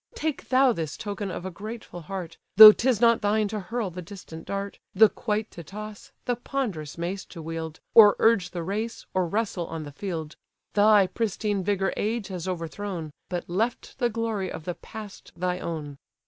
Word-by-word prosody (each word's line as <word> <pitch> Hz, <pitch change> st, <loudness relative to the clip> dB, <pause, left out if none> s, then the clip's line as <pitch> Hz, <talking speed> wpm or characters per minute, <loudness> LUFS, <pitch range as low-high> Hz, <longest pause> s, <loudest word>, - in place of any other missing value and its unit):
Take 315 Hz, -, -3 dB
thou 260 Hz, -1 st, +5 dB
this 160 Hz, -6 st, -4 dB
token 205 Hz, -1 st, -4 dB
of 180 Hz, -, -5 dB
a 190 Hz, -, -4 dB
grateful 210 Hz, -1 st, -8 dB
heart, 175 Hz, -1 st, -6 dB, 0.2 s
Though 215 Hz, 0 st, +13 dB
'tis 240 Hz, 0 st, +1 dB
not 230 Hz, 0 st, +4 dB
thine 210 Hz, +1 st, +2 dB
to 215 Hz, 0 st, -3 dB
hurl 210 Hz, +1 st, -3 dB
the 180 Hz, +2 st, -7 dB
distant 170 Hz, -3 st, -10 dB
dart, 200 Hz, 0 st, -4 dB, 0.2 s
The 220 Hz, +2 st, +7 dB
quoit 215 Hz, -1 st, -2 dB
to 170 Hz, -, -9 dB
toss, 210 Hz, +5 st, -9 dB
the 245 Hz, -, +1 dB
ponderous 220 Hz, -, -4 dB
mace 180 Hz, +3 st, -3 dB
to 170 Hz, -, -11 dB
wield, 160 Hz, 0 st, -5 dB
Or 210 Hz, -3 st, +9 dB
urge 210 Hz, -6 st, +3 dB
the 175 Hz, -2 st, -5 dB
race, 215 Hz, +6 st, -3 dB
or 185 Hz, -2 st, +1 dB
wrestle 200 Hz, -2 st, -2 dB
on 165 Hz, -1 st, -5 dB
the 145 Hz, -, -8 dB
field: 160 Hz, -1 st, -5 dB, 0.4 s
Thy 205 Hz, -1 st, +6 dB
pristine 205 Hz, -1 st, -1 dB
vigour 195 Hz, 0 st, 0 dB
age 215 Hz, -1 st, -2 dB
has 180 Hz, -2 st, -5 dB
overthrown, 175 Hz, -1 st, -4 dB, 0.2 s
But 175 Hz, -1 st, -3 dB
left 225 Hz, +9 st, -2 dB
the 240 Hz, -2 st, +2 dB
glory 220 Hz, -4 st, -2 dB
of 160 Hz, -, -7 dB
the 175 Hz, -, -2 dB
past 210 Hz, +2 st, -11 dB
thy 180 Hz, +1 st, -1 dB
own." 150 Hz, -5 st, -5 dB
200 Hz, 185 wpm, -26 LUFS, 175-220 Hz, 0.4 s, Though